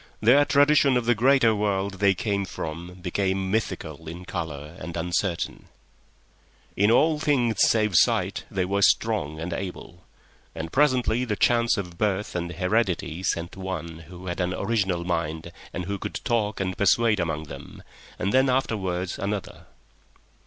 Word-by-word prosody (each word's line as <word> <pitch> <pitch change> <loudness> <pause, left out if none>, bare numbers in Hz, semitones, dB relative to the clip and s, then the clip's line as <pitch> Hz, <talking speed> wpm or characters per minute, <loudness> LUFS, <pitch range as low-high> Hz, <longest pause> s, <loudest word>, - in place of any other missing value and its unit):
Their 130 +7 +5
tradition 145 -2 +4
of 120 - -1
the 120 - +4
greater 120 0 +4
world 100 -2 -1
they 100 -1 +4
came 100 -4 -1
from 85 0 -6
became 95 +1 -1
mythical 85 -7 -3
in 90 +2 -8
colour 75 -2 -5
and 85 -1 -6
uncertain. 85 +1 -2 1.1
In 100 +2 +3
all 150 +6 +4
things 125 -8 +1
save 105 -4 +3
sight - - +2
they 95 -1 -1
were 100 +2 0
strong 75 -5 +2
and 85 +2 -4
able, 90 -1 -7 0.5
and 80 0 -5
presently 130 -4 +2
chance 120 +2 +3
sent 90 -2 -1
one 85 -4 -5
who 90 +1 -11
had 90 0 -4
an 90 0 0
original 100 -5 0
mind 80 -1 -2 0.2
and 90 - -4
who 100 +1 -3
could - - -5
talk 110 -3 0
and 95 -1 -2
persuade 105 +2 +3
among 80 -3 -2
them, 70 -2 -11 0.3
and 100 -1 -1
then 130 +1 +4
afterwards 95 -8 -1
another. 100 0 -4
95 Hz, 140 wpm, -25 LUFS, 85-110 Hz, 1.1 s, Their